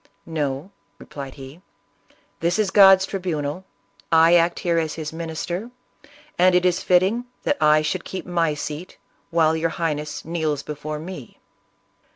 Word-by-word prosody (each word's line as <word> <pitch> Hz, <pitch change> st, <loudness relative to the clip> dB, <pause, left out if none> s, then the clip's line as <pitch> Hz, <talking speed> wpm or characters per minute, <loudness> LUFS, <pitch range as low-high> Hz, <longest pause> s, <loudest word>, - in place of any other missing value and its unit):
"No," 150 Hz, +1 st, -3 dB, 0.3 s
replied 140 Hz, +2 st, -9 dB
he, 135 Hz, +5 st, -11 dB, 0.8 s
"this 170 Hz, +3 st, 0 dB
is 210 Hz, -3 st, +1 dB
God's 195 Hz, -2 st, +7 dB
tribunal; 180 Hz, -3 st, -3 dB, 0.5 s
I 165 Hz, +1 st, +6 dB
act 170 Hz, 0 st, +3 dB
here 170 Hz, -1 st, +1 dB
as 160 Hz, -2 st, -2 dB
his 155 Hz, -1 st, -5 dB
minister, 170 Hz, +6 st, -4 dB, 0.7 s
and 180 Hz, 0 st, +5 dB
it 180 Hz, 0 st, +3 dB
is 180 Hz, +1 st, +2 dB
fit 180 Hz, -1 st, +4 dB
ting 225 Hz, +6 st, -1 dB, 0.2 s
that 290 Hz, -, -1 dB
I 155 Hz, 0 st, +5 dB
should 170 Hz, +4 st, -2 dB
keep 190 Hz, -, -6 dB
my 170 Hz, -4 st, 0 dB
seat 150 Hz, +4 st, -6 dB, 0.3 s
while 160 Hz, -1 st, +3 dB
your 165 Hz, +1 st, 0 dB
Highness 150 Hz, -2 st, -3 dB
kneels 155 Hz, -3 st, -2 dB
before 150 Hz, +1 st, -5 dB
me." 155 Hz, -5 st, -9 dB
165 Hz, 150 wpm, -22 LUFS, 150-180 Hz, 0.8 s, God's